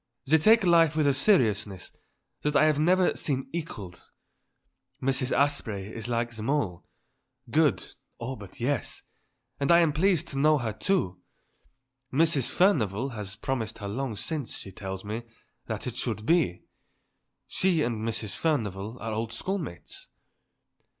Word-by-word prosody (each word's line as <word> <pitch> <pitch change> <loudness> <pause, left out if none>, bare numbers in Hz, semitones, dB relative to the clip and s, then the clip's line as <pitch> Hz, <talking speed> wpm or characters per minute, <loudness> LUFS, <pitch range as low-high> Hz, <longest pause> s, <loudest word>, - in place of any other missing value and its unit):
They 160 +4 +4
take 220 +6 +6
life 165 -3 +5
with 155 -1 +2
a 140 - +4
seriousness 110 - +2 0.5
that 150 0 -1
I 155 - +6
have 155 -2 +3
never 180 +3 +3
seen 135 -3 -2
equalled. 105 - -7 0.9
Mrs. 130 0 0
Asprey 110 -8 0
is 115 0 -5
like 120 0 -1
them 110 +3 -4
all; 110 -13 -1 0.6
good, - - +3 0.3
oh, 130 +3 -4
but 100 -5 -12
yes. 130 +1 -1 0.6
And 140 +2 +2
I 170 - +8
am 160 -3 +3
pleased 170 0 +2
to 135 - -3
know 155 +1 +5
her, 115 -5 -2
too. 105 - 0 0.9
Mrs. 150 -2 +3
Furnivall 130 - +2
had 105 -5 -6
promised 115 -4 -2
her 100 - -6
long 120 +2 -3
since, 145 +4 -2
she 95 - -8
tells 95 +1 -6
me, 110 +3 -3 0.5
that - - -4
it 125 -1 -5
should 110 -4 -2
be. 160 - +2 0.8
She 180 -5 +1
and 120 -2 -1
Mrs. 110 -1 -3
Furnivall 110 - -1
are 115 +1 -4
old 110 +1 -2
school 190 +12 -2
mates." 85 - -8
130 Hz, 150 wpm, -27 LUFS, 110-155 Hz, 0.9 s, I